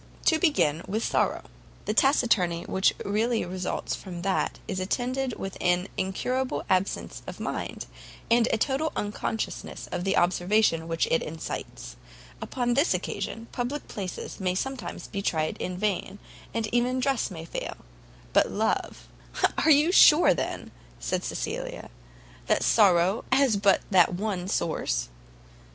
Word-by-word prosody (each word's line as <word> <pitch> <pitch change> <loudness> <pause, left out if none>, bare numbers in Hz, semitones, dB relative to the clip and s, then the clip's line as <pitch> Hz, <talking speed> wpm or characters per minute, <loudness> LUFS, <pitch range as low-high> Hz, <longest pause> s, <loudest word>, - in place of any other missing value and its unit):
To 320 - +4
begin 225 - +2
with 215 +4 -1
sorrow. - - 0 0.4
The 210 - 0
taciturnity 220 - +3
which 190 0 +2
really 220 +3 +1
results 185 +1 -3
from 175 -3 -8
that 195 0 0
is 185 - -3
attended 250 +6 -1
with 195 -1 -5
an 180 +1 +1
incurable 255 +8 -1
absence 185 +1 0
of - - -7
mind, - - -4 0.5
and 235 0 +5
a - - +2
total 275 +7 0
unconsciousness 210 +2 -4
of 175 - -2
the 195 +1 +1
observation 175 -1 +2
which 165 0 0
it 165 - +3
excites; 155 - -6 0.4
upon 245 -2 -1
this 285 +7 +3
occasion, 225 - -4
public 255 +4 -3
places 190 -3 -6
may 185 -1 0
sometimes 265 +6 -4
be 200 - -4
tried 155 -5 0
in 180 0 -4
vain, 200 -1 -1 0.3
and 230 -1 -1
even 250 +2 +2
dress 270 -1 0
may 165 -4 -8
fail; - - -5 0.6
but - - +4
love - - -2 0.3
" - - 0
"Are 320 - +4
you 300 +3 +6
sure, 325 - +7
then," - - -4 0.3
said - - -2
Cecilia, - - -3
with - - -7
a - - -11
laugh, - - -21
"that - - +2
sorrow 190 -1 +4
has 265 -4 +4
but 200 -1 +3
that 180 -2 +5
one 190 -2 -2
source?" - - -1
195 Hz, 150 wpm, -27 LUFS, 175-245 Hz, 0.6 s, sure